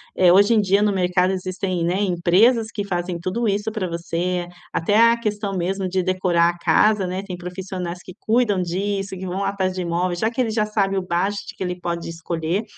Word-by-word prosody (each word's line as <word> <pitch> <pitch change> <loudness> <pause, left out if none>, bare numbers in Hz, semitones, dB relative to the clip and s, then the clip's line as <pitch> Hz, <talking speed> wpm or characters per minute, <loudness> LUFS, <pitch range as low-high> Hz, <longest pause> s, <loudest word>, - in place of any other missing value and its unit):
Eh, 180 -2 +5
hoje 200 +5 +5
em 215 - +4
dia 200 +1 +2
no 210 - +3
mercado 180 0 +2
existem, 185 -1 -2
né, 175 +2 +1
empresas 200 +6 +3
que 205 - -3
fazem 175 -2 -3
tudo 205 +7 -2
isso 205 +2 -1
para 205 -4 -2
você, 175 +1 -2 0.2
até 205 +6 +1
a 235 - +1
questão 205 -3 -2
mesmo 190 +2 -1
de 185 0 0
decorar 180 -2 +2
a 175 - -4
casa, 190 +4 +3
né, 185 +2 -3
tem 185 -3 -6
profissionais 180 0 -5
que 185 - -10
cuidam 220 -4 +2
disso, 195 +2 -2
que 190 - -6
vão 190 +3 -2
atrás 190 -2 -1
de 185 - -3
imóvel. 175 +1 -1
Já 220 +5 +1
que 245 - -8
ele 230 - 0
já 215 -1 +1
sabe 195 -2 0
o - - +1
bá 180 +1 0
acho 205 0 -2 0.2
que - - -5
ele 180 0 -3
pode 170 -1 -3
escolher. 165 +4 -2
185 Hz, 215 wpm, -22 LUFS, 175-205 Hz, 0.2 s, Eh